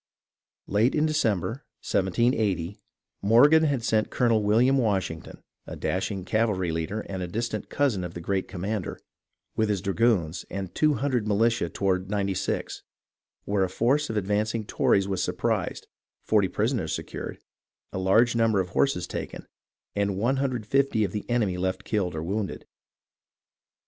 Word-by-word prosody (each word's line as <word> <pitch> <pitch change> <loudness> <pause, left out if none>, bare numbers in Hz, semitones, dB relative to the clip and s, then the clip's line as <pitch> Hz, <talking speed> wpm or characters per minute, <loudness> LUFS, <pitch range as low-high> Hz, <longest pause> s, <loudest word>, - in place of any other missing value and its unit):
Late 110 +5 +2
in 155 0 +3
December, 115 - 0 0.2
1780, 100 -2 +1 0.4
Morgan 145 +10 +6
had 140 -6 0
sent 110 -1 +1
Colonel 115 -3 +2
William 120 +6 +3
Washington, 95 -8 -2 0.2
a - - -6
dashing 95 0 -2
cavalry 100 -5 +1
leader 80 +7 -2
and 95 -2 -6
a 90 - -3
dis 115 +7 -2
tant 110 - -5
cousin 130 -10 +1
of 90 -1 -6
the - - -4
great 95 +2 -1
commander, 100 +1 -4 0.6
with 110 -1 +1
his 100 -2 +1
dragoons 95 -4 +1
and 95 -2 -5
200 140 -7 +1
militia 110 -3 +2
toward 95 0 -1
Ninety 100 -1 0
Six, - - -3 0.6
where 100 -1 +1
a 95 - 0
force 135 +10 +1
of 110 - -2
ad 100 - 0
vancing 105 +2 0
Tories 100 -2 +2
was 95 -2 -1
surprised, - - -1 0.4
40 105 -3 +3
prisoners 110 +3 -1
secured, - - -6 0.5
a - - -2
large 110 +6 +4
number 115 -3 +3
of 90 -1 -1
horses 90 -3 +1
taken, - - -6 0.5
and 100 -1 0
150 130 0 +1
of 100 - -1
the 105 +4 -5
enemy 105 -7 +1
left 95 +1 -2
killed 95 -6 -1
or 80 - -3
wounded. 100 +3 -3
105 Hz, 150 wpm, -26 LUFS, 95-115 Hz, 0.6 s, Morgan